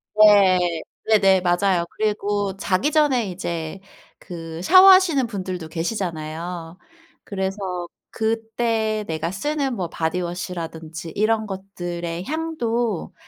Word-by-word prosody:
네. 185 -5 +5 0.3
네네 195 -3 +5
맞아요. 175 0 +2
그리고 205 -2 -1
자기 195 +9 0
전에 270 -8 +2
이제 170 -1 -4 0.4
그 165 -2 -8
샤워하시는 370 - +7
분들도 185 -6 -5
계시잖아요. 165 -1 -4 0.5
그래서 190 -2 -3 0.2
그때 225 -1 -1
내가 160 +1 -2
쓰는 275 +5 -2
뭐 180 -5 -3
바디워시라든지 165 -1 -4
이런 220 +1 +1
것들의 175 -3 -5
향도 240 - -2
190 Hz, 240 characters per minute, -22 LUFS, 175-220 Hz, 0.5 s, 샤워하시는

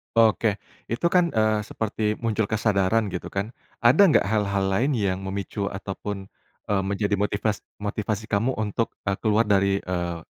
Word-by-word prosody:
Oke. 110 -2 +4 0.3
Itu 145 +9 0
kan, 175 -2 +3
eee, 110 -1 +3
seperti 110 0 -2
muncul 110 -2 +1
kesadaran 110 -1 +1
gitu 90 - -4
kan. 100 +3 -3 0.3
Ada 145 +12 +7
nggak 155 - +4
hal-hal 100 -2 +1
lain 125 +9 +2
yang 95 -4 0
memicu 100 +1 -3
ataupun, 95 0 -5 0.4
eee, 100 - +2
menjadi 100 +1 0
motivas 105 +1 0 0.2
motivasi 105 +1 -2
kamu 115 +6 +1
untuk, 110 +1 -2
eee, 100 -1 -1
keluar 110 0 +3
dari, 100 -2 +2
eee, 85 -2 -2
105 Hz, 150 wpm, -25 LUFS, 100-110 Hz, 0.4 s, Ada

